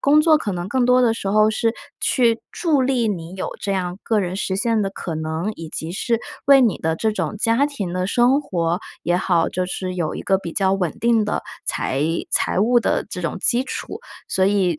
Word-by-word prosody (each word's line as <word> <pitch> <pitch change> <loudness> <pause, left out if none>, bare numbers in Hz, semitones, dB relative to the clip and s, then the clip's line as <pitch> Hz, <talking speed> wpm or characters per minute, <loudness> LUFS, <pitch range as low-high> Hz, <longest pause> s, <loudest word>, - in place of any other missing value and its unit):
工 295 +2 +5
作 310 0 +5
可 220 - -3
能 175 +1 -4
更 255 +1 +1
多 250 +1 +4
的 230 -3 +3
时 195 - -4
候 215 +1 +4
是 225 +1 0 0.3
去 235 -3 +2
助 300 -6 +1
力 250 -3 +1
你 175 -2 -4
有 190 - -4
这 200 - -2
样 180 0 -2
个 220 -2 +1
人 180 -1 -3
实 190 -1 -2
现 225 +1 +1
的 195 - -1
可 170 -4 -5
能， 160 +6 -3
以 165 -1 -8
及 160 +2 -5
是 230 +3 0 0.3
为 275 -1 +7
你 230 -6 +2
的 160 0 -1
这 220 +2 0
种 210 - -3
家 230 +6 +2
庭 200 -12 -5
的 185 0 -1
生 250 +6 +3
活 175 - -1 0.2
也 175 +1 +1
好， 175 -2 +2
就 185 0 -2
是 185 0 -4
有 170 -4 -2
一 - - -5
个 190 -1 +2
比 170 -4 -7
较 190 -1 +1
稳 180 -5 0
定 230 -2 +3
的 210 - -2 0.2
财 135 +2 -1 0.3
财 - - +1
务 240 +4 +4
的 - - 0
这 180 - -5
种 170 - -2
基 245 +5 +2
础。 415 - -6 0.3
所 190 - +2
以 185 -6 +1
200 Hz, 240 characters per minute, -21 LUFS, 180-235 Hz, 0.3 s, 为